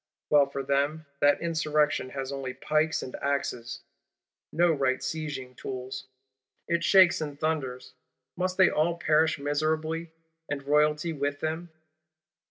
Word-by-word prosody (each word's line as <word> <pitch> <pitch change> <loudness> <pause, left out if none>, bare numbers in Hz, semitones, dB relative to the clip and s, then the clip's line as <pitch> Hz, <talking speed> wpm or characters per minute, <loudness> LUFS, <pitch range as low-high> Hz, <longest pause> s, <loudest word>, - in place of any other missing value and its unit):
Well 145 -2 +6
for 140 0 -4
them, 140 +3 0
that 145 0 +4
Insurrection 150 -4 +1
has 135 0 -5
only 135 -2 -5
pikes 155 +1 0
and 130 - -7
axes; 125 -4 -2 0.7
no 170 +1 +3
right 135 -4 +1
sieging 145 -6 -5
tools! 130 +1 -6 0.6
It 170 0 0
shakes 185 -1 +6
and 145 -2 -5
thunders. 145 -5 -2 0.4
Must 185 +1 -2
they 190 -1 +6
all 165 +3 +1
perish 160 -1 +2
miserably, 155 +3 -1 0.4
and 145 -1 -3
Royalty 150 +3 +2
with 145 -1 -2
them? 160 +2 -3
150 Hz, 130 wpm, -28 LUFS, 140-160 Hz, 0.7 s, Well